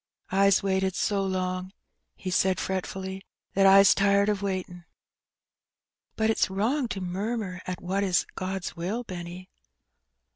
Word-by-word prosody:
'^Fs 195 0 +4
waited 190 -1 0
so 200 -2 0
long/' 185 -1 -2 0.5
he 185 - -5
said 185 0 +2
fretfully, 190 0 -4 0.3
'^that 195 0 +4 0.2
Fs 200 - +7
tired 200 0 +3
of 205 -2 0
waitin'." 185 -3 -4 1.3
'^But 220 0 +2
it's 220 - +1
wrong 235 +8 0
to 195 -4 -5
murmur 190 +1 -3
at 180 -1 -4
what 190 +3 0
is 185 -2 +2
God's 185 -1 -4
will, 190 +8 -3
Benny." 180 -2 -8
190 Hz, 135 wpm, -27 LUFS, 185-200 Hz, 1.3 s, Fs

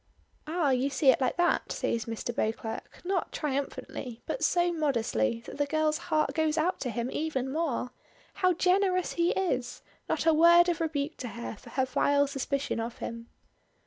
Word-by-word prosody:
"Ah, 315 -3 +1
you 260 +2 +1
see 270 0 +5
it - - -1
like 255 - 0
that!" 350 0 +1
says, 230 -1 -1
Mr. 230 +1 -4
Beauclerk, 220 0 -3
not 370 -2 -1
triumphantly, 270 -4 -4
but - - -3
so 350 0 +2
modestly 225 - 0
that - - -9
the 290 - +1
girl's 310 +1 +1
heart 310 0 +2
goes 315 -1 +1
out 345 +4 +1
to 250 - -2
him 235 +2 -3
even 270 -4 -2
more. 285 -5 -1 0.5
How 370 -1 +5
generous 365 +1 +2
he 340 0 +2
is! 260 -10 -2 0.3
Not - - 0
a 325 - +5
word 340 +2 +7
of 340 -1 -1
rebuke 310 -1 -2
to 250 - -5
her 235 +1 -6
for - - -14
her 260 -1 0
vile 285 +2 +2
suspicion 275 -2 -2
of 230 +1 -4
him. 230 0 -6
285 Hz, 175 wpm, -29 LUFS, 250-335 Hz, 0.5 s, word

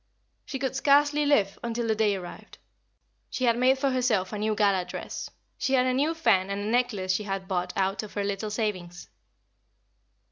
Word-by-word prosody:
She 270 - -5
could 265 0 -3
scarcely 290 +2 +3
live 205 -9 +2
until 235 0 -2
the 220 - +2
day 215 -2 +1
arrived. 180 -2 -9 0.7
She 255 - -4
had 235 -2 +4
made 255 +2 +3
for 270 0 0
herself 235 -7 0
a 210 - -3
new 215 0 0
gala 200 -3 +2
dress; 180 - -6 0.3
she 270 - 0
had 255 -1 +3
a 255 - +1
new 295 +5 +1
fan 195 - +2
and 200 0 -2
a - - -4
necklace 225 -7 +1
she 210 +3 -2
had 195 -1 -4
bought 180 -2 -2
out 195 +1 0
of 215 - -10
her 205 - -1
little 200 +1 -3
savings. 190 -5 -4
215 Hz, 190 wpm, -27 LUFS, 195-255 Hz, 0.7 s, had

